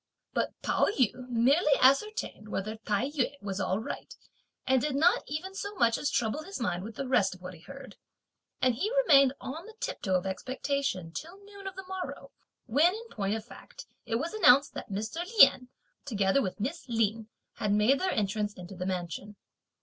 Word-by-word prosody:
But - - -2
Pao - - +2
yü 255 - 0
merely 275 +6 +4
ascertained 275 - +2
whether 215 +2 -3
Tai 220 +4 -1
yü 285 -1 -1
was 200 -1 -4
all 190 -1 0
right, 225 +6 -6 0.5
and 260 -1 +3
did 290 0 -1
not 325 +5 +4
even 330 +6 -4
so 405 +2 -5
much 230 -9 +3
as 290 - -1
trouble 230 +6 0
his 385 +1 -7
mind 180 -6 -1
with 220 +1 -8
the 275 - -4
rest 240 -8 +2
of 185 - -18
what 180 0 -7
he 170 - -13
heard; 275 +9 -11 0.7
and 255 -1 +4
he 390 - -2
remained 275 - +6
on 320 +9 -7
the 445 - -13
tiptoe 190 -1 -2
of 180 +1 0
expectation, 260 - -2
till 335 - -7
noon 400 -1 -10
of 385 - -6
the 385 0 -8
morrow; 375 -1 -6 0.3
when, 300 - +3
in 460 +1 -9
point 200 0 -1
of 220 -1 -6
fact, - - -12 0.2
it 225 - -1
was 305 - -2
announced 280 -10 +5
that - - -7
Mr. 220 - -3
Lien, 265 -5 +7 0.3
together 205 0 +1
with 190 -3 -4
Miss 270 +5 -4
Lin, 225 -1 0 0.3
had 210 -3 -1
made 210 +7 +4
their 375 - 0
entrance 210 - -1
into 180 0 -9
the 185 0 -4
mansion. 185 +2 -4
250 Hz, 190 wpm, -29 LUFS, 205-300 Hz, 0.7 s, Lien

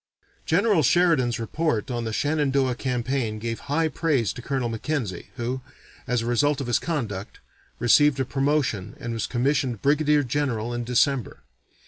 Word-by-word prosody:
General 195 +1 +3
Sheridan's 140 -6 +3
report 120 +1 -1
on 120 -1 -2
the 110 - -2
Shenandoah 140 -1 +1
campaign 125 -2 -2
gave 115 +1 -4
high 160 +3 +2
praise 150 - 0
to 125 - -8
Colonel 130 -1 -1
Mackenzie, 115 - -3
who, 125 +2 -3 0.5
as 125 -1 0
a - - -4
result 140 +4 +2
of 135 - -3
his 120 -1 +1
conduct, 110 - -4 0.4
received 140 +3 +4
a 130 - +1
promotion 135 -7 0
and 120 0 -4
was 115 - -2
commissioned 130 -2 0
brigadier 150 +1 +3
general 120 -4 -1
in 120 0 -2
December. 125 - +1
130 Hz, 150 wpm, -25 LUFS, 115-145 Hz, 0.5 s, received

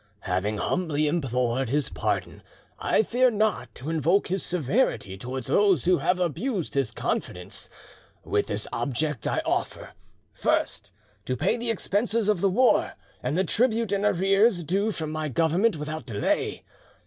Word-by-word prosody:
Having 95 +4 -1
humbly 155 - 0
implored 130 -5 0
his 145 +2 0
pardon, - - -2 0.4
I - - +2
fear 250 +4 +3
not 215 -2 -1
to 145 +6 -5
invoke 165 +6 +2
his 190 0 -1
severity 175 - 0
towards 125 +6 -5
those 195 - +3
who 180 0 +4
have 180 0 +1
abused 180 - -2
his 135 -5 +1
confidence. - - -3 0.5
With 105 - 0
this 105 +1 -2
object 135 +1 -2
I - - 0
offer—First, 100 - -3 0.3
to 130 - -2
pay 220 - +1
the 240 0 -3
expenses 220 +1 0
of 205 -5 +2
the 195 - +3
war 250 +7 +3 0.3
and 155 - -1
the 190 - +3
tribute 225 +2 +1
in 200 0 0
arrears 195 0 +3
due 195 +7 0
from 160 -6 -4
my 155 -1 -2
Government 170 - +2
without 150 -3 -5
delay. 105 -4 -1
170 Hz, 150 wpm, -26 LUFS, 135-205 Hz, 0.5 s, who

